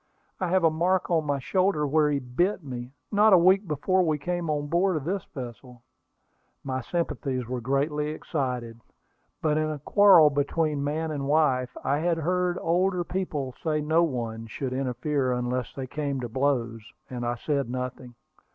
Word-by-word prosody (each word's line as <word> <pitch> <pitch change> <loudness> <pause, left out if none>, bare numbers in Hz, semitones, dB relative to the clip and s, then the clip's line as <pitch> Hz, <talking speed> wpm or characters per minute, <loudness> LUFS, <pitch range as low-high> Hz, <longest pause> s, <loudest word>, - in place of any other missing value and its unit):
I 185 - -1
have 185 +1 +2
a 165 - +5
mark 180 +3 +1
on 160 -3 +1
my 145 -1 +1
shoulder 185 +3 +1
where 150 +1 +3
he 145 - +1
bit 165 +9 -1
me, 125 -2 -7 0.2
not 210 0 +5
a - - +9
week 190 +3 +4
before 185 +5 +1
we 155 -4 +1
came 175 +2 -3
on 145 -1 -1
board 175 +4 +1
of 150 - -4
this 185 +4 -2
vessel." 125 -2 -9 0.8
My 130 -1 -3
sympathies 135 -4 -2
were 125 0 -3
greatly 145 +4 0
excited; 125 -7 -3 0.6
but 155 -1 +2
in 155 0 0
a 155 - -3
quarrel 170 0 +6
between 145 +1 0
man 155 +2 -2
and 140 -2 -3
wife, 135 -4 +2
I 140 +2 +1
had 170 +1 +1
heard 180 +2 0
older 180 +2 +1
people 155 -8 -3
say 155 -2 +1
no 160 +3 +2
one 115 -7 -2
should 130 +4 -4
interfere 130 +1 -1
unless 125 -1 -2
they 135 - -4
came 140 +1 -3
to 120 - -3
blows, 120 -3 0 0.3
and 125 -1 -5
I 120 0 -1
said 140 +1 -2
nothing. 125 -1 -5
150 Hz, 175 wpm, -26 LUFS, 130-170 Hz, 0.8 s, a